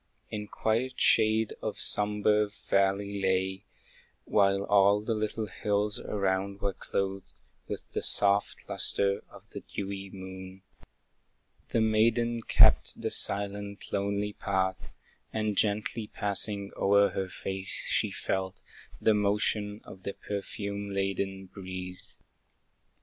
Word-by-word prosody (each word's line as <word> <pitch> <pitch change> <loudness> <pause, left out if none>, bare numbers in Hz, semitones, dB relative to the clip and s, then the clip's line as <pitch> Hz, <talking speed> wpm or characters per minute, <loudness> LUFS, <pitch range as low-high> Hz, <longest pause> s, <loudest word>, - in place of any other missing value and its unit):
In 105 -1 -4
quiet 115 +5 -1
shade 110 0 +4
the - - -2
sombre 105 0 +2
valley 100 0 0
lay, 95 0 0 0.6
While 100 -1 +3
all 100 0 +4
the 115 +2 -1
little 110 0 -2
hills 105 +3 0
around 100 0 -1
were 100 -1 -1
clothed 95 0 -3 0.3
With - - -6
the - - -2
soft 100 0 +2
lustre 100 0 +1
of - - -16
the - - -6
dewy 100 -1 -6
moon. 95 0 -9 1.1
The 115 - +1
maiden 115 +2 +2
kept - - +5
the - - -2
silent, 100 0 +1
lonely 100 +1 -1
path, 95 -2 -1 0.4
And 110 -1 -1
gently 105 +2 0
passing 100 -1 -1
o'er 100 +1 +4
her 95 -1 -3
face, 95 0 -4
she - - +2
felt 95 0 -3 0.4
The 110 - +4
motion 105 0 0
of 95 - -12
the 100 - -4
perfume 100 0 -5
laden 95 0 -2
breeze. 95 -1 -8
100 Hz, 115 wpm, -29 LUFS, 95-105 Hz, 1.1 s, kept